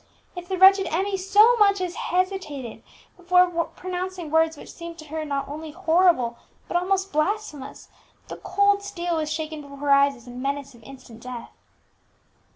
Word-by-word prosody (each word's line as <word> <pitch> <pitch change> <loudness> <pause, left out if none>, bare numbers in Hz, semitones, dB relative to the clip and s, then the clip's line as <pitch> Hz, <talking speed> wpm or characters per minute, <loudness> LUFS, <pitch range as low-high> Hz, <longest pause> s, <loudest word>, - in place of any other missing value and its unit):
If 355 0 -8
the 380 - -1
wretched 385 0 +6
Emmie 385 +5 -1
so 410 +5 +5
much 400 -2 +4
as 360 -1 -3
hesitated 360 - -3 0.3
before 360 0 +4 0.3
pronouncing 365 -3 -5
words 320 0 +2
which - - -11
seemed 335 -1 -9
to 310 - -11
her 315 +1 -4
not 280 -2 -3
only 310 +2 -7
horrible 325 -7 +2 0.3
but - - -6
almost 385 +2 0
blasphemous, 305 -3 -3 0.4
the - - -7
cold 405 0 +2
steel 350 -4 -3
was 310 -1 -2
shaken 310 0 -4
before 280 -1 -12
her 285 0 -1
eyes, 280 0 +5
as 240 - -17
a 245 - -10
menace 275 +2 -4
of 235 - -18
instant 235 -2 -13
death. 250 -1 -8
330 Hz, 165 wpm, -24 LUFS, 280-375 Hz, 0.4 s, wretched